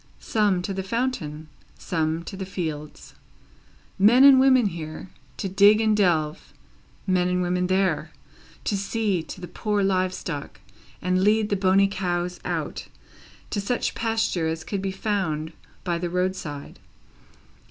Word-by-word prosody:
Some, 205 Hz, -5 st, +1 dB
to 195 Hz, -, -3 dB
the 190 Hz, -, -3 dB
fountain; 190 Hz, -, -3 dB, 0.3 s
some, 160 Hz, -1 st, -1 dB
to 195 Hz, -, -7 dB
the 190 Hz, -, -5 dB
fields; 155 Hz, -5 st, -6 dB, 0.9 s
men 235 Hz, +7 st, +6 dB
and 275 Hz, -1 st, +9 dB
women 260 Hz, -3 st, +5 dB
here, 160 Hz, 0 st, -7 dB, 0.3 s
to 195 Hz, -, -3 dB
dig 200 Hz, +3 st, +5 dB
and 220 Hz, -1 st, +3 dB
delve; 165 Hz, -6 st, 0 dB, 0.5 s
men 180 Hz, -2 st, +2 dB
and 180 Hz, 0 st, 0 dB
women 180 Hz, 0 st, 0 dB
there, 190 Hz, 0 st, +1 dB, 0.5 s
to 205 Hz, -, 0 dB
see 200 Hz, -2 st, -1 dB
to 165 Hz, -, -9 dB
the 180 Hz, -, -7 dB
poor 205 Hz, +3 st, -1 dB
live 185 Hz, -1 st, +1 dB
stock, 145 Hz, -10 st, -6 dB, 0.4 s
and 185 Hz, +1 st, +1 dB
lead 215 Hz, +1 st, +3 dB
the 205 Hz, -, +1 dB
bony 195 Hz, +1 st, +4 dB
cows 180 Hz, -2 st, -2 dB
out, -, -, -4 dB, 0.6 s
to 205 Hz, -, -1 dB
such 240 Hz, +5 st, -1 dB
pasture 225 Hz, -7 st, 0 dB
as 160 Hz, 0 st, -3 dB
could 200 Hz, -2 st, -3 dB
be 195 Hz, 0 st, -2 dB
found 185 Hz, -6 st, -2 dB, 0.3 s
by 175 Hz, -2 st, -1 dB
the 175 Hz, 0 st, -2 dB
roadside. 180 Hz, -5 st, -3 dB
185 Hz, 145 wpm, -24 LUFS, 170-205 Hz, 0.9 s, and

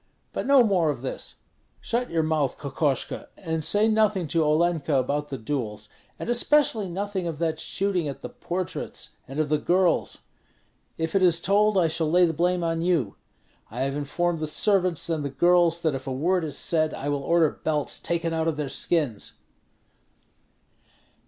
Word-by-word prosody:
But -, -, -3 dB
no 275 Hz, -2 st, +7 dB
more 185 Hz, -7 st, +2 dB
of 135 Hz, -4 st, -3 dB
this! 130 Hz, -, -4 dB, 0.4 s
Shut 245 Hz, +1 st, -2 dB
your 165 Hz, -1 st, +1 dB
mouth, 155 Hz, -4 st, 0 dB
Kokoshko, 140 Hz, -1 st, -2 dB
and 160 Hz, -3 st, -3 dB
say 205 Hz, +7 st, +4 dB
nothing 215 Hz, -5 st, +2 dB
to 165 Hz, +2 st, +2 dB
Olenka 155 Hz, -1 st, +1 dB
about 145 Hz, +3 st, 0 dB
the 135 Hz, -, -4 dB
duels, 110 Hz, -4 st, -4 dB, 0.3 s
and -, -, -6 dB
especially 240 Hz, -4 st, +3 dB
nothing 190 Hz, 0 st, -3 dB
of 165 Hz, -3 st, -4 dB
that 160 Hz, -1 st, -1 dB
shooting 185 Hz, -4 st, -1 dB
at 140 Hz, -, -6 dB
the -, -, -6 dB
portraits 180 Hz, 0 st, -5 dB, 0.2 s
and 135 Hz, +3 st, -6 dB
of 155 Hz, -, +1 dB
the 150 Hz, 0 st, +2 dB
girls. 180 Hz, +2 st, +1 dB, 0.8 s
If 160 Hz, 0 st, -2 dB
it 195 Hz, -, +3 dB
is 175 Hz, -2 st, +4 dB
told, 205 Hz, +3 st, +3 dB
I 175 Hz, -3 st, +4 dB
shall 160 Hz, 0 st, 0 dB
lay 180 Hz, +2 st, +5 dB
the 165 Hz, -, 0 dB
blame 175 Hz, +2 st, +1 dB
on 165 Hz, 0 st, -1 dB
you. 165 Hz, -, 0 dB, 0.5 s
I 120 Hz, +4 st, -5 dB
have 135 Hz, +1 st, -1 dB
informed 165 Hz, +4 st, -1 dB
the 155 Hz, -, -2 dB
servants 185 Hz, 0 st, +1 dB
and 160 Hz, -3 st, -1 dB
the 140 Hz, -, -2 dB
girls 170 Hz, +3 st, +3 dB
that 160 Hz, -3 st, +1 dB
if 135 Hz, 0 st, -6 dB
a -, -, -2 dB
word 170 Hz, +7 st, +1 dB
is 155 Hz, -3 st, -4 dB
said, 155 Hz, -2 st, 0 dB
I 140 Hz, -, -5 dB
will 145 Hz, -1 st, -1 dB
order 165 Hz, +1 st, +3 dB
belts 150 Hz, -2 st, -1 dB
taken 170 Hz, -1 st, -2 dB
out 160 Hz, 0 st, 0 dB
of 160 Hz, -2 st, -1 dB
their 150 Hz, -2 st, -3 dB
skins." 140 Hz, -8 st, -1 dB
165 Hz, 180 wpm, -25 LUFS, 145-180 Hz, 0.8 s, no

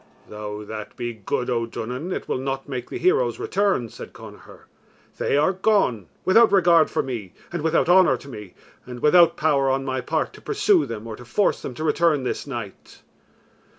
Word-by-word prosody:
"Though 105 Hz, 0 st, -7 dB
that 105 Hz, -1 st, -8 dB
be 120 Hz, -1 st, -4 dB
good, 110 Hz, +3 st, -3 dB
O 115 Hz, -1 st, 0 dB
Duanan, 125 Hz, +9 st, -5 dB
it -, -, -4 dB
will -, -, -1 dB
not 135 Hz, 0 st, -4 dB
make 125 Hz, -3 st, -5 dB
the -, -, -5 dB
heroes 430 Hz, +7 st, +2 dB
return," 200 Hz, -, 0 dB
said -, -, -10 dB
Connachar; -, -, -13 dB, 0.6 s
"they -, -, +1 dB
are 155 Hz, +6 st, +3 dB
gone 185 Hz, -, +1 dB, 0.2 s
without 225 Hz, +4 st, +5 dB
regard 170 Hz, -4 st, +5 dB
for -, -, -1 dB
me, 115 Hz, -8 st, -6 dB, 0.2 s
and 170 Hz, -, -2 dB
without 160 Hz, +1 st, +1 dB
honour 180 Hz, +1 st, +5 dB
to -, -, -14 dB
me, 105 Hz, -8 st, -10 dB, 0.3 s
and 125 Hz, -1 st, -8 dB
without 170 Hz, +2 st, +5 dB
power 140 Hz, -3 st, +2 dB
on 135 Hz, 0 st, 0 dB
my 130 Hz, -1 st, -2 dB
part 160 Hz, +5 st, -2 dB
to -, -, -14 dB
pursue 415 Hz, -4 st, +2 dB
them 110 Hz, -1 st, -6 dB
or 115 Hz, -1 st, -6 dB
to -, -, -11 dB
force 195 Hz, -, +1 dB
them 125 Hz, -, -6 dB
to 155 Hz, -, -5 dB
return 160 Hz, -3 st, +2 dB
this 130 Hz, -, -3 dB
night." 115 Hz, -8 st, -8 dB
135 Hz, 190 wpm, -23 LUFS, 120-175 Hz, 0.6 s, without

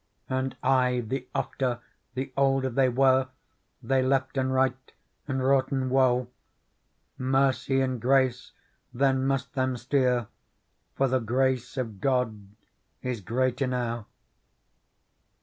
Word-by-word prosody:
And 130 Hz, 0 st, -2 dB
aye 125 Hz, -2 st, +2 dB
the 130 Hz, +3 st, -4 dB
ofter, 125 Hz, -3 st, -1 dB, 0.4 s
the 130 Hz, +1 st, -4 dB
older 135 Hz, -1 st, +2 dB
they 130 Hz, +1 st, +3 dB
were. 130 Hz, +1 st, +3 dB, 0.6 s
They 130 Hz, +3 st, +2 dB
leften 130 Hz, 0 st, 0 dB
right 130 Hz, 0 st, 0 dB, 0.4 s
and 135 Hz, -2 st, -1 dB
wroughten 130 Hz, -1 st, +1 dB
woe. 125 Hz, -2 st, +3 dB, 0.9 s
Mercy 135 Hz, 0 st, +2 dB
and 130 Hz, -3 st, -1 dB
grace 130 Hz, 0 st, +2 dB, 0.4 s
then 135 Hz, +1 st, +1 dB
must 135 Hz, -1 st, -1 dB
them 130 Hz, -2 st, 0 dB
steer. 125 Hz, -1 st, +1 dB, 0.7 s
For 135 Hz, -, +2 dB
the 130 Hz, 0 st, +1 dB
grace 130 Hz, +2 st, 0 dB
of 110 Hz, -7 st, -4 dB
God 115 Hz, -6 st, 0 dB, 0.6 s
is 125 Hz, -4 st, -3 dB
great 125 Hz, +6 st, -1 dB
enow. 120 Hz, -4 st, -2 dB
130 Hz, 115 wpm, -27 LUFS, 125-135 Hz, 0.9 s, they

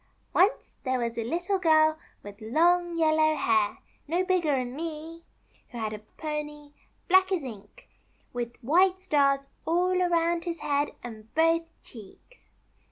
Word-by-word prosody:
Once 395 Hz, +7 st, +2 dB
there 260 Hz, -1 st, 0 dB
was 235 Hz, -1 st, -2 dB
a 230 Hz, -, -2 dB
Little 350 Hz, -, -1 dB
Girl 315 Hz, -2 st, +4 dB, 0.2 s
with 205 Hz, +1 st, -11 dB
long 340 Hz, +8 st, +2 dB
yellow 310 Hz, -1 st, +3 dB
hair 220 Hz, -6 st, +1 dB, 0.2 s
— -, -, -38 dB
no 350 Hz, +4 st, 0 dB
bigger'n 295 Hz, -9 st, 0 dB
me 325 Hz, +1 st, -6 dB, 0.2 s
— -, -, -35 dB
who 240 Hz, -, -9 dB
had 220 Hz, -2 st, -3 dB
a 210 Hz, -, -6 dB, 0.2 s
pony, 300 Hz, -1 st, -5 dB, 0.4 s
black 375 Hz, +1 st, +4 dB
as 360 Hz, -6 st, 0 dB
ink, 210 Hz, -5 st, -11 dB, 0.5 s
with 240 Hz, -1 st, -4 dB
white 365 Hz, +8 st, +3 dB
stars 280 Hz, -6 st, +2 dB, 0.2 s
all 365 Hz, +2 st, +1 dB
around 340 Hz, -1 st, +1 dB
his 340 Hz, -1 st, -4 dB
head 285 Hz, 0 st, -1 dB
and 220 Hz, -2 st, -10 dB
both 330 Hz, +1 st, +3 dB, 0.2 s
cheeks. 225 Hz, -, -14 dB
310 Hz, 150 wpm, -27 LUFS, 250-345 Hz, 0.5 s, Girl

